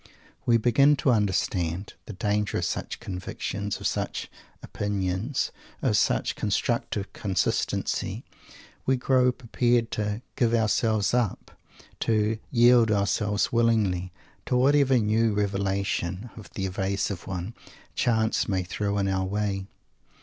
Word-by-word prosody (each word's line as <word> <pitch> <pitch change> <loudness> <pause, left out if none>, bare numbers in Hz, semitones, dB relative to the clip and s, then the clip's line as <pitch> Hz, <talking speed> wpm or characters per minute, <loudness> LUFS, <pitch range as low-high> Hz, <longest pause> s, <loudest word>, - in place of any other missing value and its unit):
We 120 -1 +5
begin 135 +6 +4
to 135 -2 +2
understand 95 -4 0
the 110 - -6
danger 105 +1 0
of - - -1
such - - -3
convictions, 100 +2 -4
of - - -8
such - - -2 0.3
opinions, 100 +5 -2 0.3
of - - +2
such - - +1
"constructive 100 -1 -1
consistency." 95 -4 -1 0.6
We 130 - +4
grow 125 0 +3
prepared 120 -1 0
to 105 +2 -2
"give 120 -1 +2
ourselves 110 -1 +1
up" 120 -5 -1 0.5
to 110 0 +1
"yield 120 -2 +5
ourselves 105 0 +1
willingly," 105 -6 +2 0.4
to 125 - +2
whatever 135 0 +4
new 110 0 +2
Revelation 100 0 -1
of 110 -4 -11
the 95 - -2
Evasive 95 0 -2
One 95 +3 -4 0.4
chance 110 -2 +1
may 95 -2 0
throw 100 +3 -2
in 100 -1 +1
our 95 -1 0
way. 100 -1 -2
105 Hz, 120 wpm, -26 LUFS, 95-115 Hz, 0.6 s, We